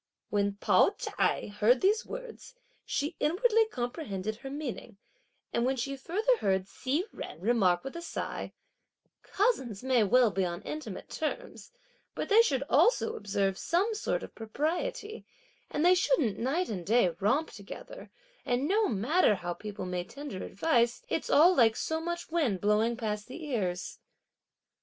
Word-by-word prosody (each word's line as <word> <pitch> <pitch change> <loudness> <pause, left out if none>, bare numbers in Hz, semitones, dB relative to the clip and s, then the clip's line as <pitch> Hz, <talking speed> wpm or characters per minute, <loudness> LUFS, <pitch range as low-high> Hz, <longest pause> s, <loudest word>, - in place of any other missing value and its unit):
When 200 -1 +1
Pao 205 - +3
ch'ai - - -1
heard 220 +5 +3
these 425 +4 +2
words, - - -9 0.3
she 300 +4 -2
inwardly 445 +7 +3
comprehended 240 - -4
her 270 - -8
meaning, 270 -6 -6 0.6
and 235 - +1
when 260 +2 +1
she 275 +2 -3
further 410 - +1
heard 190 - +1
Hsi 280 - -1
Jen - - -7
remark 190 -4 +2
with 270 - -7
a 340 - -5
sigh: 340 - -5 0.7
"Cousins 265 - 0
may 255 -3 +3
well 235 +2 +4
be 190 +1 0
on 175 +2 -3
intimate 305 +7 -6
terms, - - -5 0.4
but - - -3
they 435 +2 +7
should 275 - +1
also 475 - +3
observe 195 -2 -1
some 390 +7 +1
sort 430 - -2
of - - -9
propriety; 340 - -3 0.5
and 300 - 0
they 360 - +7
shouldn't 350 - +1
night 300 +10 0
and 190 -5 -4
day 220 +1 +3
romp 265 +11 +1
together; 205 - -10 0.3
and 250 +3 0
no 420 +4 +3
matter 230 - +3
how 175 -2 -4
people 205 +1 -7
may 180 -1 -2
tender 280 -2 -7
advice 235 -1 +1
it's - - -2
all 340 +5 +6
like 225 -3 +5
so 320 0 -2
much 345 0 -4
wind 280 - +1
blowing 215 +4 +2
past 210 -3 -3
the 315 +5 -8
ears." 190 -10 -3
255 Hz, 155 wpm, -30 LUFS, 210-340 Hz, 0.7 s, they